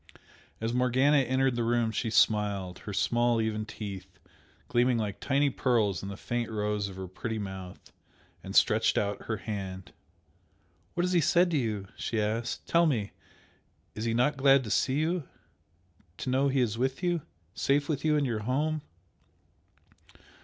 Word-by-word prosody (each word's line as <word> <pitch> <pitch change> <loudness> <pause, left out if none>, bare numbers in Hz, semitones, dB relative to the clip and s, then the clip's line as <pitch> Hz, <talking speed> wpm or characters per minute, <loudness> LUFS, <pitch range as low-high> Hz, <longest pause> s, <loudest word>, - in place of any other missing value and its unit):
As 115 +1 -2
Morgana 130 +4 +3
entered 130 -1 +1
the 120 - 0
room 115 -1 +1
she 115 +1 -2
smiled, 100 -4 +2
her - - -3
small 120 +4 +2
even 110 -1 -1
teeth 100 -4 -8 0.5
gleaming 120 0 +2
like 105 -3 -3
tiny 140 0 +2
pearls 110 -9 +1
in 100 - -6
the 100 - -7
faint 120 +1 -3
rose 105 -1 -1
of 95 - -10
her 95 0 -6
pretty 110 +5 -4
mouth, 95 -3 -7 0.5
and - - -7
stretched - - +4
out 100 -1 -1
her 110 - -2
hand. 95 -4 -6 1.0
"What 175 - +1
has 180 +1 0
he 175 - +4
said 175 +3 +3
to 160 - +2
you?" 105 -6 -2
she 115 - -2
asked 110 +3 -2
"Tell 170 0 +4
me! 110 -9 -1 0.8
Is 110 - -4
he 115 0 0
not 140 +5 +2
glad 135 0 +5
to 105 - -5
see 130 - +2
you? 165 +1 0 0.9
to 130 - -3
know 135 +2 +3
he 135 -1 +2
is 115 -2 -1
with 130 +6 -1
you? 175 -2 +1 0.3
safe 145 +5 +1
with 150 -4 -2
you 155 -1 +3
in 145 - +1
your 115 -4 -1
home?" 145 +7 -1
120 Hz, 165 wpm, -29 LUFS, 105-135 Hz, 1.0 s, glad